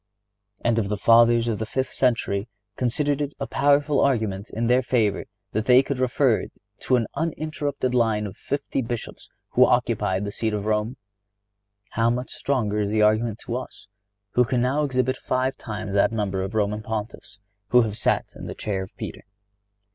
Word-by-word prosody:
(99) -, -, +2 dB
And 115 Hz, -, +2 dB
if 100 Hz, -3 st, -1 dB
the 105 Hz, -, -1 dB
Fathers 115 Hz, +2 st, +5 dB
of 110 Hz, -3 st, -1 dB
the 110 Hz, -, -2 dB
fifth 130 Hz, +3 st, -2 dB
century 115 Hz, -4 st, 0 dB, 0.3 s
considered 145 Hz, +4 st, 0 dB
it 145 Hz, 0 st, -3 dB
a 140 Hz, -, -2 dB
powerful 145 Hz, +1 st, +2 dB
argument 110 Hz, -7 st, 0 dB
in 115 Hz, +2 st, -2 dB
their 125 Hz, +2 st, +4 dB
favor 115 Hz, -5 st, 0 dB, 0.3 s
that 110 Hz, +1 st, -1 dB
they 125 Hz, +1 st, +6 dB
could 135 Hz, -1 st, -3 dB
refer 130 Hz, -1 st, +2 dB, 0.3 s
to 130 Hz, -, +2 dB
an 120 Hz, -2 st, +1 dB
uninterrupted 150 Hz, -5 st, -2 dB
line 110 Hz, -3 st, +2 dB
of 100 Hz, 0 st, -7 dB
fifty 140 Hz, +1 st, -3 dB
Bishops 120 Hz, -1 st, -6 dB, 0.2 s
who -, -, +5 dB
occupied 105 Hz, -5 st, +1 dB
the 100 Hz, -, -4 dB
See 110 Hz, +2 st, -1 dB
of 105 Hz, -1 st, -3 dB
Rome, 110 Hz, +4 st, -1 dB, 0.9 s
how 115 Hz, +1 st, +2 dB
much 125 Hz, +2 st, -2 dB
stronger 110 Hz, -7 st, -1 dB
is 100 Hz, -1 st, 0 dB
the 105 Hz, 0 st, +2 dB
argument 110 Hz, +1 st, +2 dB
to 120 Hz, -, -3 dB
us 130 Hz, -, -9 dB, 0.5 s
who 125 Hz, -, +4 dB
can 125 Hz, +1 st, 0 dB
now 140 Hz, +4 st, +1 dB
exhibit 130 Hz, -2 st, 0 dB
five 130 Hz, +1 st, -1 dB
times 105 Hz, -5 st, -6 dB
that 100 Hz, +4 st, +3 dB
number 100 Hz, -4 st, -1 dB
of 95 Hz, +3 st, -4 dB
Roman 105 Hz, 0 st, 0 dB
Pontiffs 110 Hz, -1 st, -6 dB, 0.3 s
who 125 Hz, +1 st, +5 dB
have 105 Hz, -2 st, -3 dB
sat -, -, 0 dB
in -, -, -8 dB
the -, -, -6 dB
chair 100 Hz, -3 st, -3 dB
of 95 Hz, -, -9 dB
Peter! -, -, -6 dB
115 Hz, 185 wpm, -24 LUFS, 105-130 Hz, 0.9 s, they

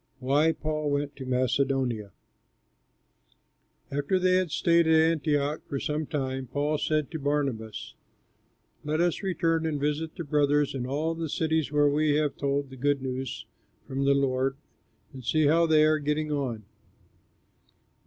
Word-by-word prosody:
WHY 140 Hz, +5 st, +2 dB
PAUL 155 Hz, -1 st, -2 dB
WENT 145 Hz, 0 st, -1 dB
TO 130 Hz, -2 st, -8 dB
MACEDONIA 130 Hz, -3 st, 0 dB, 1.8 s
After 145 Hz, +7 st, 0 dB
they 185 Hz, 0 st, +3 dB
had 185 Hz, -2 st, 0 dB
stayed 170 Hz, +2 st, +3 dB
at 160 Hz, -, +5 dB
Antioch 155 Hz, -2 st, +1 dB
for 140 Hz, -, -3 dB
some 150 Hz, +1 st, -2 dB
time, 130 Hz, -3 st, -3 dB
Paul 145 Hz, +3 st, -1 dB
said 155 Hz, -2 st, 0 dB
to 160 Hz, -, -4 dB
Barnabas, 135 Hz, -7 st, -2 dB, 0.9 s
"Let 150 Hz, +1 st, -1 dB
us 175 Hz, -1 st, +1 dB
return 165 Hz, -4 st, 0 dB
and 150 Hz, -2 st, -2 dB
visit 150 Hz, +2 st, -2 dB
the 170 Hz, -, -5 dB
brothers 145 Hz, -1 st, +2 dB
in 125 Hz, -2 st, -3 dB
all 155 Hz, +5 st, -1 dB
the 165 Hz, -1 st, -4 dB
cities 160 Hz, -1 st, 0 dB
where 145 Hz, 0 st, +4 dB
we 150 Hz, +1 st, +2 dB
have 150 Hz, -2 st, 0 dB
told 140 Hz, -1 st, -1 dB
the 130 Hz, -, -10 dB
good 140 Hz, +1 st, 0 dB
news 130 Hz, -1 st, -4 dB, 0.4 s
from 135 Hz, +1 st, -2 dB
the 140 Hz, 0 st, +4 dB
Lord, 135 Hz, 0 st, 0 dB, 0.6 s
and 130 Hz, -1 st, -9 dB
see 155 Hz, +5 st, +2 dB
how 165 Hz, +3 st, +4 dB
they 155 Hz, -1 st, +5 dB
are 155 Hz, 0 st, +3 dB
getting 150 Hz, +1 st, -1 dB
on." 130 Hz, -7 st, -2 dB
145 Hz, 155 wpm, -27 LUFS, 135-155 Hz, 1.8 s, at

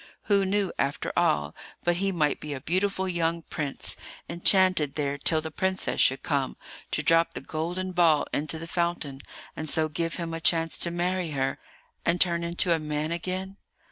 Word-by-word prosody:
Who 200 Hz, -2 st, +3 dB
knew, 200 Hz, -1 st, 0 dB
after 140 Hz, +1 st, -1 dB
all, 75 Hz, 0 st, +2 dB, 0.3 s
but 175 Hz, 0 st, +2 dB
he 195 Hz, +1 st, +1 dB
might 150 Hz, -5 st, +1 dB
be 150 Hz, -1 st, -5 dB
a -, -, -5 dB
beautiful 190 Hz, +4 st, 0 dB
young 170 Hz, -2 st, 0 dB
prince, 145 Hz, -4 st, -2 dB, 0.3 s
enchanted 175 Hz, -3 st, +3 dB
there 145 Hz, -2 st, -1 dB
till 155 Hz, +2 st, +2 dB
the 160 Hz, 0 st, -6 dB
princess 190 Hz, +4 st, 0 dB
should 130 Hz, -, +3 dB
come 140 Hz, -3 st, -1 dB, 0.3 s
to 155 Hz, -, -1 dB
drop 165 Hz, +2 st, +3 dB
the -, -, -2 dB
golden 175 Hz, +4 st, -3 dB
ball 170 Hz, -4 st, +4 dB
into 155 Hz, +2 st, -1 dB
the 165 Hz, -, -6 dB
fountain, 165 Hz, -5 st, -2 dB, 0.4 s
and 155 Hz, -1 st, -3 dB
so 155 Hz, +1 st, +3 dB
give 165 Hz, +2 st, -2 dB
him 170 Hz, -2 st, -4 dB
a 165 Hz, -, -4 dB
chance 165 Hz, -1 st, +3 dB
to 170 Hz, -, +2 dB
marry 175 Hz, 0 st, -1 dB
her 135 Hz, -1 st, -1 dB, 0.4 s
and 170 Hz, +1 st, +1 dB
turn 170 Hz, -1 st, +2 dB
into 170 Hz, +1 st, +3 dB
a 165 Hz, -, +1 dB
man 150 Hz, +1 st, -2 dB
again? 185 Hz, +3 st, -3 dB
165 Hz, 180 wpm, -27 LUFS, 150-180 Hz, 0.4 s, ball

